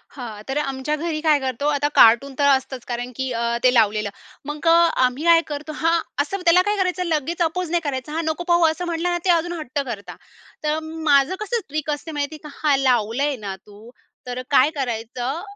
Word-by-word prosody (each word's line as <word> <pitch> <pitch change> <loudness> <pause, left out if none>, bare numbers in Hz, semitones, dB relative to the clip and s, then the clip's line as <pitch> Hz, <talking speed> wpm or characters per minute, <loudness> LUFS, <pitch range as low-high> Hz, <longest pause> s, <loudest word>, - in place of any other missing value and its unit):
हां. 230 -6 -7
तर 270 - -1
आमच्या 275 0 -2
घरी 310 0 -3
काय 305 -2 +3
करतो, 265 +1 -2
आता 290 0 +1
कार्टूनतर 265 +5 +5
असतच. 265 -1 -9
कारण 245 +1 -4
की 265 0 -3
अ, 235 0 -1
ते 255 0 +5
लावलेलं, 215 -2 +2 0.4
मग 295 +3 -5
अ, - - +7 0.3
आम्ही 255 +5 -2
काय 335 -1 +6
करतो 300 +1 -5
हां. 330 +1 +3 0.2
असं 385 +7 -3
त्याला 350 +2 +6
काय 415 - +1
करायचं, 365 -1 0
लगेच 330 +2 -2
अपोज 340 +1 0
नाही 345 -1 +1
करायचं. 280 0 -4
हां. 330 +1 -1
नको 315 +2 -2
पाहू 345 -1 +4
असं 320 +3 -2
म्हटलं 340 0 -1
ना 350 - 0
ते - - +1
अजून 345 0 +2
हट्ट 285 -2 -4
करता. 215 -5 -7 0.5
तर 305 +1 0
माझं 315 -1 +1
कसं 445 +3 -1
ट्रिक 305 +1 -3
असते 300 +2 -5
माहितीये 295 +1 -4
का? - - -10
हा 295 -2 +4
लावलंय 260 +2 +1
ना 195 -1 -4
तू, 210 +2 -15 0.4
तर 250 0 -4
काय 275 0 +5
करायचं. 245 +4 -3
290 Hz, 200 wpm, -22 LUFS, 255-330 Hz, 0.5 s, अ